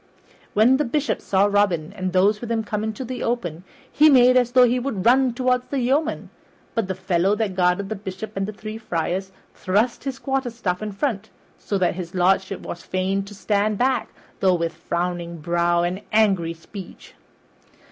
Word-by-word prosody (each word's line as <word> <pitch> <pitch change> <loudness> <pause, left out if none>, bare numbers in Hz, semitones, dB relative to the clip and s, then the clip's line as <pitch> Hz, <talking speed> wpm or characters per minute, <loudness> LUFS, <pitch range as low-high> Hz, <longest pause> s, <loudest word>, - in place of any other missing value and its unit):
When 235 +5 +5
the 295 - +1
Bishop 295 +3 -1
saw 195 0 +2
Robin 200 -6 +1
and 185 0 -3
those 200 +3 +3
with 235 -1 -5
him 225 -1 0
come 210 0 -3
into 220 +4 -4
the 250 0 -5
open 180 -9 -2 0.3
he 305 +1 +6
made 255 -2 +6
as 245 -1 +2
though 255 0 +7
he 245 +1 +3
would 255 -1 -3
have 190 - -4
run 255 +2 +5
toward 250 +1 0
the 280 - -2
yeoman, 270 +5 0 0.4
but 225 -4 -1
the 190 - -3
fellow 185 +1 +1
that 210 -3 -1
guarded 180 +1 +1
the 220 - -3
Bishop 200 +2 -7
and 195 0 -1
the - - -4
three 215 +1 -8
friars 190 -1 -2 0.2
thrust 210 +9 0
his 270 -2 -3
quarterstaff 240 -10 -2
in 215 -1 -4
front, 220 0 -2 0.3
so 200 - -2
that 185 -2 +1
his 180 0 -7
lordship 190 +2 +1
was 170 - -7
fain 190 +2 -1
to 205 +1 -11
stand 205 +1 0
back, 255 0 +1 0.3
though 185 -2 +3
with 170 -1 -2
frowning 170 -1 -3
brow 170 +1 +1
and 180 +3 -2
angry 195 -6 +2
speech. 185 +3 -11
205 Hz, 190 wpm, -23 LUFS, 185-240 Hz, 0.4 s, though